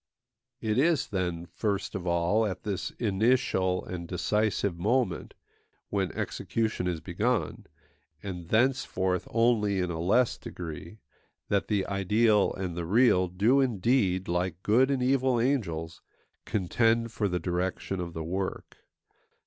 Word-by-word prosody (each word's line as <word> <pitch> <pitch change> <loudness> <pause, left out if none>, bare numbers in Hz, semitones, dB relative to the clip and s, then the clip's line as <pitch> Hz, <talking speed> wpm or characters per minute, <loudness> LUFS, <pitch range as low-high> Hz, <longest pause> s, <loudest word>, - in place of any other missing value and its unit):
It 110 +1 0
is, 160 +1 +2
then, 90 -3 -2
first 100 +3 -2
of 90 -2 -4
all, 85 +6 +2
at 95 - -5
this 100 -3 -3
initial 100 -4 +1
and 85 -2 -6
decisive 100 0 0
moment 105 -2 0 0.5
when 95 -4 -1
execution 110 -5 -2
is 85 -3 -1
begun, 100 0 -1 0.6
and 90 -4 -6
thenceforth 110 -7 +1
only 115 -4 +2
in 90 -1 -1
a 80 - -4
less 110 +9 +2
degree, 85 +3 -8 0.5
that 100 -1 +1
the 100 -3 0
ideal 105 +2 +2
and 90 -3 -4
the 85 -1 -4
real 100 -3 +4
do 105 +10 +3
indeed, 105 -5 +1
like 90 0 -2
good 125 +6 +4
and 135 -2 0
evil 130 -1 +2
angels, 85 - -1 0.4
contend 115 +4 +1
for 105 -2 -1
the 90 -2 -1
direction 90 +2 -2
of 85 -1 -5
the 80 - -4
work. 95 +3 -4
100 Hz, 135 wpm, -28 LUFS, 90-115 Hz, 0.6 s, real